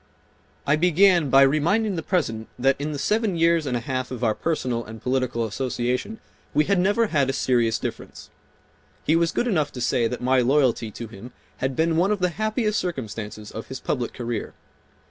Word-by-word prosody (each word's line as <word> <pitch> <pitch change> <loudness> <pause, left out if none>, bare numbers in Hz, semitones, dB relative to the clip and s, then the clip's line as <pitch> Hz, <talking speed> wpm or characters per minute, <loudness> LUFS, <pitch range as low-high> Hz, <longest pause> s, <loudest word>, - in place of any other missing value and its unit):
I 145 +2 +3
began 175 -1 +4
by 135 +1 +7
reminding 175 +10 +2
the 165 - -2
President 115 - -1
that 135 +2 +3
in 150 +1 -2
the 145 - -4
seven 210 +4 0
years 165 -2 +3
and 125 -2 0
a - - -4
half 130 0 -3
of 125 -1 -6
our 110 -2 +3
personal 125 -5 -2
and 110 +1 -10
political 125 -2 -1
association 125 - -2 0.4
we 150 +1 +4
had 200 -2 +2
never 205 +5 +3
had 140 -3 +2
a - - 0
serious 120 -4 +1
difference. - - -7 0.7
He 160 - +2
was 165 0 +2
good - - 0
enough 155 -11 0
to 125 - -7
say 120 -1 +1
that 125 +2 -4
my 130 +1 +2
loyalty 125 -3 +2
to 115 +3 -7
him 115 +3 -11 0.3
bad 130 0 -1
been 160 +2 +1
one 180 +4 +3
of 210 - +1
the 180 -1 +1
happiest 215 +3 -1
circumstances 110 - -5
of 110 - -7
his 130 - -6
public 125 -4 -2
career. 120 -3 -5
135 Hz, 195 wpm, -24 LUFS, 120-170 Hz, 0.7 s, by